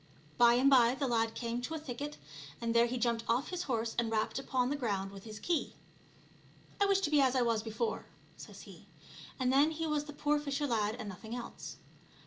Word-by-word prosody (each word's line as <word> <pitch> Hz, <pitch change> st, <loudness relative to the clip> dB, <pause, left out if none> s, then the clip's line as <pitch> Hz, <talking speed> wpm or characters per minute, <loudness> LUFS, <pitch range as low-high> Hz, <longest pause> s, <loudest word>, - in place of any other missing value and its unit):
By 240 Hz, 0 st, +7 dB
and 255 Hz, +3 st, +4 dB
by 250 Hz, -3 st, +6 dB
the 275 Hz, -, -1 dB
lad 225 Hz, -2 st, +1 dB
came 235 Hz, 0 st, -3 dB
to 285 Hz, +6 st, -4 dB
a -, -, -3 dB
thicket, 290 Hz, +1 st, -6 dB, 0.4 s
and 230 Hz, -1 st, -1 dB
there 235 Hz, 0 st, +5 dB
he 250 Hz, +2 st, -3 dB
jumped 235 Hz, -1 st, 0 dB
off 240 Hz, +4 st, +3 dB
of -, -, -10 dB
his 360 Hz, -1 st, -3 dB
horse 230 Hz, -2 st, -1 dB
and 235 Hz, -1 st, 0 dB
rapped 220 Hz, +3 st, 0 dB
upon 260 Hz, -1 st, 0 dB
the -, -, +1 dB
ground 200 Hz, -8 st, -2 dB
with 195 Hz, +1 st, -11 dB
bis 215 Hz, -1 st, -8 dB
key. 330 Hz, +6 st, -1 dB, 0.5 s
'' -, -, -25 dB
I 400 Hz, -, +5 dB
wish 395 Hz, -1 st, +3 dB
to 300 Hz, -, 0 dB
be 295 Hz, -2 st, +5 dB
as 265 Hz, -1 st, +3 dB
I 255 Hz, -, +3 dB
was 230 Hz, -2 st, +1 dB
before/* 220 Hz, +1 st, -3 dB, 0.3 s
says -, -, -11 dB
he, -, -, -14 dB, 0.5 s
and 255 Hz, 0 st, +2 dB
then 285 Hz, +3 st, +5 dB
he 320 Hz, +1 st, -3 dB
was 300 Hz, -1 st, -1 dB
the 295 Hz, -, -9 dB
poor 295 Hz, +1 st, +1 dB
fisher 290 Hz, 0 st, -2 dB
lad 220 Hz, -4 st, 0 dB
and 230 Hz, -4 st, -6 dB
nothing 220 Hz, +4 st, -7 dB
else. 245 Hz, -, -7 dB
245 Hz, 230 wpm, -33 LUFS, 230-290 Hz, 0.5 s, By